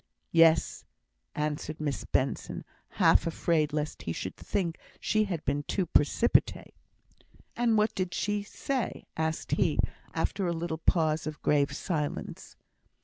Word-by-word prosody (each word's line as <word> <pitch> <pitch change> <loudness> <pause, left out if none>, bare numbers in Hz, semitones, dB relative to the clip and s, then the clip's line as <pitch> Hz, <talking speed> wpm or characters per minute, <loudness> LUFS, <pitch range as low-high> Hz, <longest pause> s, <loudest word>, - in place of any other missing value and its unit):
"Yes," 165 -1 +4 0.5
answered 150 0 -3
Miss 145 -3 -2
Benson, 130 +1 -1 0.3
half - - +4
afraid 160 -2 +1
lest 150 0 -3
he 85 - -3
should 95 - -5
think 170 -4 -2 0.2
she 215 -1 +2
had 175 -6 -4
been 140 +2 +1
too 185 +5 -1
precipitate. 170 +9 +2 0.8
"And 235 -2 +2
what 215 +1 +2
did 185 -2 -2
she 205 0 0
say?" 250 +4 -3
asked 160 0 -2
he, - - +2 0.4
after 195 -3 0
a 170 - 0
little 165 -1 -3
pause 155 -2 +2
of 155 -1 -5
grave 145 -1 +3
silence. 155 -4 -4
160 Hz, 135 wpm, -29 LUFS, 150-190 Hz, 0.8 s, Yes